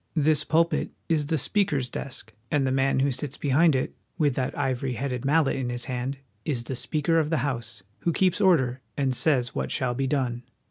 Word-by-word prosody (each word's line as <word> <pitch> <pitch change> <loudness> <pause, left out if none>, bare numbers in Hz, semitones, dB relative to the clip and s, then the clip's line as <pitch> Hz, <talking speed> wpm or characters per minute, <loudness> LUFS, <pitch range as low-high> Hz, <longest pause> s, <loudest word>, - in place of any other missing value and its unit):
This 155 -1 +3
pulpit 165 +2 +2 0.2
is 155 -3 +1
the 160 - +1
Speaker's 150 - +1
desk, 125 -4 -6 0.2
and 145 -2 +2
the 130 - +1
man 135 0 +2
who 140 +1 +2
sits 135 +2 -4
behind 145 +2 +3
it, 130 - -1 0.2
with 150 -5 +2
that 130 0 -2
ivory 130 -2 -1
headed 125 0 -3
mallet 150 0 +3
in 130 -2 -2
his 120 0 -3
hand, 130 +2 -3 0.3
is 130 -6 -1
the 130 - -4
Speaker 155 +5 +1
of 155 -2 0
the 160 -2 +1
House, 120 -6 -4 0.2
who 170 - 0
keeps 185 +3 +2
order 130 -10 +3 0.2
and 135 -3 +1
says 125 -4 +2
what 65 -1 -2
shall 125 -2 +1
be 135 +2 -1
done. 125 -4 0
135 Hz, 200 wpm, -26 LUFS, 125-155 Hz, 0.3 s, This